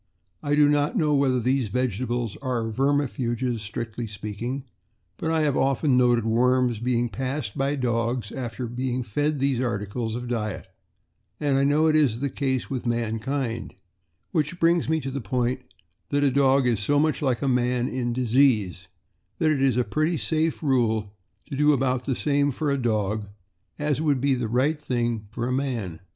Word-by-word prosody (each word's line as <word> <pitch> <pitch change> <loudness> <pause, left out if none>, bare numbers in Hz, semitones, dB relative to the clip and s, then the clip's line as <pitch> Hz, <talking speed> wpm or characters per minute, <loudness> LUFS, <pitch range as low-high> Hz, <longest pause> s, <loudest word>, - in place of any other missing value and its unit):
I 145 0 +1
do 150 -1 +5
not 145 - +1
know 155 -5 +2
whether 135 -3 +2
these 125 -1 0
vegetables 120 0 -1
are 125 -4 -2
vermifuges, 130 -2 0
strictly 115 +1 -5
speaking, 110 +6 -5 0.5
but 160 - -2
I 160 -1 +2
have 145 -3 +1
often 135 0 +2
noted 120 -2 +3
worms 125 0 +2
being 120 0 +1
passed 130 -2 -3
by 140 +2 0
dogs 120 -3 -1
after 125 -1 -4
being 125 +1 -2
fed 145 +7 -1
these 135 -2 +1
articles 110 -1 -2
of 125 0 -5
diet; 110 -4 -3 0.7
and 140 -2 +2
I - - +3
know 150 +3 +3
it 155 -1 +3
is 135 -7 +3
the 140 0 -2
case 130 -2 -1
with 130 -2 -4
mankind, 115 +2 -2 0.6
which 165 0 -1
brings 170 -2 +3
me 160 0 +2
to 135 0 -4
the 140 0 -4
point 125 +2 -1 0.5
that 145 0 +1
a 140 - +3
dog 135 0 +3
is 120 -4 +2
so 145 +8 +1
much 155 +1 +1
like 130 -4 0
a - - +1
man 125 -1 +1
in 120 -2 -2
disease, 120 -7 +2 0.5
that 160 -2 +2
it 140 -3 0
is 135 -3 +3
a 125 - +3
pretty 155 +10 0
safe 160 0 -1
rule 110 -7 +1 0.3
to 145 - -6
do 150 +2 +4
about 130 -2 0
the 135 - 0
same 145 +1 +1
for 145 +2 -1
a 140 - +1
dog 105 -2 0 0.5
as 150 0 0
would 145 -4 +2
be 140 +1 +2
the 125 -3 -1
right 135 +7 +1
thing 120 -6 -2
for 120 +2 -3
a 125 - -1
man. 120 -11 -2
130 Hz, 180 wpm, -25 LUFS, 115-140 Hz, 0.7 s, do